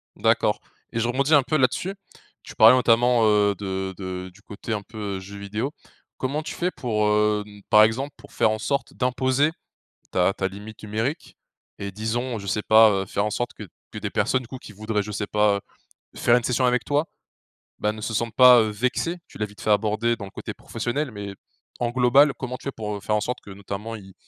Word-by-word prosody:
D'accord -, -, +2 dB, 0.3 s
et 115 Hz, -, -2 dB
je 115 Hz, -, +1 dB
rebondis 140 Hz, +5 st, +1 dB
un 140 Hz, -, +5 dB
peu 155 Hz, +3 st, 0 dB
là-dessus. 165 Hz, +8 st, +1 dB, 0.5 s
Tu -, -, -12 dB
parlais 110 Hz, +3 st, +8 dB
notamment, 120 Hz, -1 st, +4 dB
heu, 105 Hz, -1 st, +4 dB
de 95 Hz, -1 st, -4 dB
de 95 Hz, -1 st, -5 dB
du 105 Hz, -, -20 dB
côté 105 Hz, +3 st, -6 dB
un 105 Hz, -, -2 dB
peu, 105 Hz, -1 st, -6 dB
heu, -, -, -6 dB
jeux 100 Hz, +2 st, -10 dB
vidéos. 105 Hz, +7 st, -3 dB, 0.5 s
Comment 140 Hz, +4 st, -2 dB
tu 155 Hz, -, -6 dB
fais 180 Hz, +1 st, -1 dB
pour, 110 Hz, -8 st, -1 dB
hem, 105 Hz, -1 st, 0 dB
par 105 Hz, 0 st, +8 dB
exemple, 130 Hz, +6 st, 0 dB
pour -, -, -16 dB
faire 110 Hz, -, +3 dB
en 110 Hz, -, 0 dB
sorte 140 Hz, +6 st, -2 dB
d'imposer 130 Hz, +3 st, +1 dB, 0.6 s
ta 90 Hz, +1 st, +2 dB
ta 95 Hz, -, -1 dB
limite 105 Hz, +3 st, -10 dB
numérique 110 Hz, +8 st, -3 dB, 0.4 s
et 100 Hz, 0 st, -5 dB
disons, 115 Hz, +4 st, -2 dB
je 100 Hz, -, -8 dB
sais 105 Hz, +2 st, -1 dB
pas, 110 Hz, 0 st, +7 dB
heu, -, -, -9 dB
faire 100 Hz, -, -1 dB
en -, -, 0 dB
sorte 120 Hz, +2 st, -3 dB
que -, -, -9 dB, 0.3 s
que -, -, -6 dB
des -, -, -3 dB
personnes, 130 Hz, -, +1 dB
du 125 Hz, -, -12 dB
coup, 130 Hz, -, -7 dB
qui 120 Hz, -, -12 dB
voudraient 105 Hz, 0 st, -2 dB
je 105 Hz, -, -7 dB
sais 105 Hz, 0 st, -3 dB
pas, 105 Hz, -1 st, +2 dB, 0.5 s
faire 120 Hz, +1 st, +4 dB
une 120 Hz, -, -2 dB
session 125 Hz, +1 st, +1 dB
avec 125 Hz, 0 st, +1 dB
toi, 145 Hz, +2 st, +1 dB, 0.7 s
bah, 105 Hz, -, +1 dB
ne 110 Hz, -, -9 dB
se 110 Hz, -, -3 dB
sentent 115 Hz, +1 st, -2 dB
pas, 125 Hz, -1 st, +9 dB
heu, 110 Hz, -, +1 dB
vexées? 125 Hz, +10 st, -1 dB
Tu -, -, -12 dB
l'as 105 Hz, -, -1 dB
vite 105 Hz, 0 st, -14 dB
fait 110 Hz, -, +1 dB
abordé 110 Hz, +3 st, +2 dB
dans 105 Hz, -, -7 dB
le 95 Hz, -, -11 dB
côté -, -, -7 dB
professionnel 135 Hz, +3 st, -3 dB
mais 100 Hz, -2 st, -6 dB, 0.5 s
en 120 Hz, -1 st, 0 dB
global, 130 Hz, +4 st, +5 dB
comment 125 Hz, -1 st, -5 dB
tu -, -, -18 dB
fais 140 Hz, -, -2 dB
pour, 105 Hz, -1 st, -4 dB
heu, -, -, -8 dB
faire 105 Hz, -, -1 dB
en 105 Hz, -, +1 dB
sorte 125 Hz, +4 st, -3 dB
que 100 Hz, -, -12 dB
notamment 100 Hz, +3 st, -6 dB
ils 95 Hz, -3 st, -12 dB
110 Hz, 225 wpm, -24 LUFS, 105-125 Hz, 0.7 s, pas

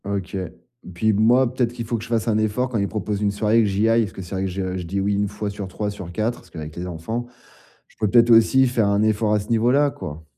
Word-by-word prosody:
OK. 100 Hz, -1 st, -4 dB, 0.6 s
Puis 110 Hz, +5 st, +2 dB
b 100 Hz, -, 0 dB
moi, 120 Hz, +3 st, +4 dB
peut-être 120 Hz, -2 st, 0 dB
qu'il 120 Hz, -1 st, -5 dB
faut 115 Hz, +1 st, -2 dB
que 110 Hz, -, -7 dB
je 115 Hz, -, -10 dB
fasse 115 Hz, -1 st, 0 dB
un 110 Hz, -2 st, +2 dB
effort, 110 Hz, +4 st, 0 dB
quand 115 Hz, -4 st, -1 dB
il 100 Hz, -, 0 dB
propose 105 Hz, 0 st, -3 dB
une 105 Hz, -1 st, +1 dB
soirée 105 Hz, +2 st, +2 dB
et -, -, +5 dB
que 110 Hz, -, +2 dB
j'y 100 Hz, +3 st, +1 dB
aille, 115 Hz, +1 st, +4 dB
parce 105 Hz, -, -6 dB
que -, -, -8 dB
c'est 90 Hz, -, -9 dB
vrai 95 Hz, -, -1 dB
que -, -, -2 dB
je 95 Hz, 0 st, -3 dB
je 90 Hz, -, -4 dB
dis 95 Hz, +4 st, -3 dB
oui 100 Hz, +1 st, 0 dB
1 100 Hz, +1 st, 0 dB
fois 105 Hz, +1 st, -4 dB
sur 100 Hz, -1 st, -6 dB
3, 105 Hz, +2 st, -4 dB
sur 95 Hz, -4 st, -8 dB
4, 110 Hz, +6 st, -2 dB
parce -, -, -20 dB
qu'avec 80 Hz, -1 st, -8 dB
les 90 Hz, +1 st, -5 dB
enfants. 100 Hz, +8 st, -4 dB, 0.6 s
Je -, -, -27 dB
pourrais 110 Hz, -2 st, 0 dB
peut-être 120 Hz, 0 st, +5 dB
aussi 125 Hz, +4 st, +5 dB
faire 115 Hz, -4 st, +1 dB
un 100 Hz, +1 st, +2 dB
effort 110 Hz, 0 st, +1 dB
à 105 Hz, -, +3 dB
ce 100 Hz, -, -8 dB
niveau-là, 125 Hz, +6 st, +3 dB
quoi. 75 Hz, -, -8 dB
105 Hz, 295 wpm, -22 LUFS, 100-115 Hz, 0.6 s, et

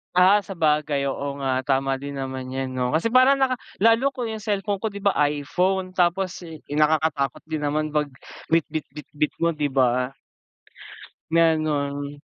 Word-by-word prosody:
Ah, 195 Hz, +3 st, +5 dB
sabagay 150 Hz, -6 st, 0 dB
oo 140 Hz, +1 st, -4 dB
nga 130 Hz, -1 st, 0 dB
tama 135 Hz, -1 st, +1 dB
din 140 Hz, +1 st, -6 dB
naman 130 Hz, -1 st, -5 dB
yan, 135 Hz, 0 st, -2 dB
'no? 125 Hz, -1 st, 0 dB
Kasi 160 Hz, +8 st, +1 dB
parang 255 Hz, +3 st, +5 dB
naka 260 Hz, -1 st, +2 dB, 0.2 s
lalo 230 Hz, +6 st, +4 dB
ko 245 Hz, -3 st, -4 dB
yung 220 Hz, -1 st, -6 dB
cellphone 205 Hz, -1 st, -1 dB
ko, 215 Hz, +2 st, -3 dB
di 200 Hz, -, -7 dB
ba 200 Hz, 0 st, +1 dB, 0.2 s
iPhone, 185 Hz, +6 st, -1 dB
tapos 180 Hz, +1 st, 0 dB, 0.2 s
nakakatakot 150 Hz, -1 st, +1 dB
din 155 Hz, -2 st, -3 dB
naman 155 Hz, +1 st, -1 dB
pag 150 Hz, -2 st, 0 dB, 0.4 s
bitbit-bitbit 150 Hz, -2 st, -1 dB
mo, 170 Hz, -1 st, +1 dB
'di 145 Hz, -2 st, -1 dB
ba? 125 Hz, 0 st, +2 dB, 1.2 s
Ganon. 145 Hz, -3 st, +1 dB
155 Hz, 145 wpm, -24 LUFS, 140-190 Hz, 1.2 s, Ah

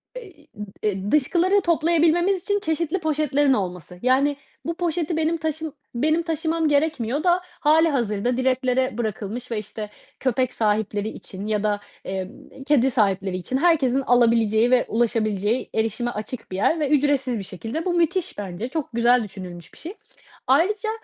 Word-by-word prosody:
be -, -, -6 dB
i 330 Hz, -6 st, -18 dB
ıb 210 Hz, 0 st, -7 dB, 0.2 s
eee, 205 Hz, -1 st, -1 dB
dışkıları 360 Hz, +7 st, +3 dB
toplayabilmemiz 340 Hz, +2 st, +2 dB
için 410 Hz, 0 st, 0 dB
çeşitli 320 Hz, +1 st, -1 dB
poşetlerin 290 Hz, -3 st, +2 dB
olması. 180 Hz, -4 st, -4 dB
Yani, 275 Hz, +3 st, +2 dB, 0.3 s
bu 335 Hz, -, -1 dB
poşeti 335 Hz, -1 st, -1 dB
benim 320 Hz, +1 st, +1 dB
taşım 315 Hz, -1 st, -3 dB, 0.2 s
benim 310 Hz, +6 st, +1 dB
taşımam 325 Hz, 0 st, 0 dB
gerekmiyor 290 Hz, -2 st, 0 dB
da 355 Hz, 0 st, +3 dB
hâlihazırda 285 Hz, -, +1 dB
direklere 255 Hz, -1 st, +1 dB
bırakılmış 230 Hz, +2 st, -4 dB
ve, 220 Hz, -, -1 dB
işte, 210 Hz, 0 st, -7 dB, 0.3 s
köpek 255 Hz, -1 st, 0 dB
sahipleri 210 Hz, -1 st, 0 dB
için 200 Hz, -1 st, -8 dB
ya 210 Hz, -1 st, 0 dB
da, 210 Hz, -1 st, +1 dB, 0.3 s
eee, 190 Hz, -1 st, -3 dB
b 270 Hz, -, -14 dB
kedi 270 Hz, -2 st, +3 dB
sahipleri 195 Hz, -5 st, +1 dB
için 220 Hz, +8 st, -2 dB
herkesin 275 Hz, -5 st, +3 dB
alabileceği 230 Hz, -2 st, +3 dB
ve 250 Hz, -1 st, +4 dB
ulaşabileceği 220 Hz, -1 st, 0 dB
erişime 225 Hz, +2 st, -1 dB
açık 220 Hz, +1 st, -7 dB
bir -, -, -3 dB
yer 320 Hz, -, +2 dB
ve 295 Hz, -3 st, 0 dB
ücretsiz 275 Hz, -4 st, +2 dB
bir -, -, -5 dB
şekilde. 225 Hz, -, -5 dB
Bu 360 Hz, -, 0 dB
müthiş. 350 Hz, +2 st, 0 dB
Bence 200 Hz, +2 st, -5 dB
çok 285 Hz, +2 st, -4 dB
güzel 240 Hz, +1 st, +4 dB
düşünülmüş 185 Hz, -4 st, -9 dB
bir -, -, -16 dB
şey. 340 Hz, +4 st, -7 dB, 0.5 s
Ayrıca 400 Hz, -, +2 dB
260 Hz, 155 wpm, -23 LUFS, 215-320 Hz, 0.5 s, ve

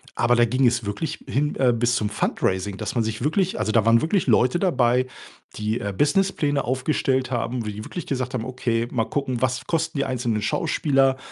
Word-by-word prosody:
Aber, 120 Hz, +1 st, +3 dB
da 120 Hz, 0 st, +5 dB
ging 130 Hz, +3 st, +1 dB
es 120 Hz, -1 st, +2 dB
wirklich 105 Hz, +11 st, -4 dB
hin, 145 Hz, +3 st, 0 dB
äh, 125 Hz, -2 st, +3 dB
bis 120 Hz, +1 st, +1 dB
zum 105 Hz, -2 st, 0 dB
Fundraising, 95 Hz, +1 st, -1 dB
dass 110 Hz, +2 st, -4 dB
man 115 Hz, -, +2 dB
sich 110 Hz, +1 st, -4 dB
wirklich 175 Hz, +5 st, 0 dB
also, 110 Hz, -, 0 dB
da 110 Hz, -2 st, +3 dB
waren 115 Hz, 0 st, +5 dB
wirklich 165 Hz, 0 st, 0 dB
Leute 125 Hz, +7 st, +3 dB
dabei, 130 Hz, -8 st, +2 dB, 0.5 s
die, 110 Hz, +2 st, -2 dB
äh, 100 Hz, -1 st, -3 dB
Business 195 Hz, +6 st, +3 dB
Pläne 145 Hz, -2 st, 0 dB
aufgestellt 130 Hz, 0 st, 0 dB
haben, 120 Hz, -1 st, -2 dB
wie 105 Hz, -, -4 dB
die 105 Hz, +1 st, -7 dB
wirklich 175 Hz, -, -7 dB
gesagt 130 Hz, -1 st, -2 dB
haben: 115 Hz, -3 st, -2 dB
„Okay, 120 Hz, -2 st, -1 dB
mal 115 Hz, -3 st, 0 dB
gucken, 130 Hz, -4 st, -2 dB
was 130 Hz, 0 st, 0 dB
kosten 160 Hz, -2 st, -1 dB
die 140 Hz, -, +1 dB
einzelnen 120 Hz, -4 st, -1 dB
Schauspieler? 135 Hz, +4 st, +1 dB
125 Hz, 205 wpm, -23 LUFS, 115-140 Hz, 0.5 s, da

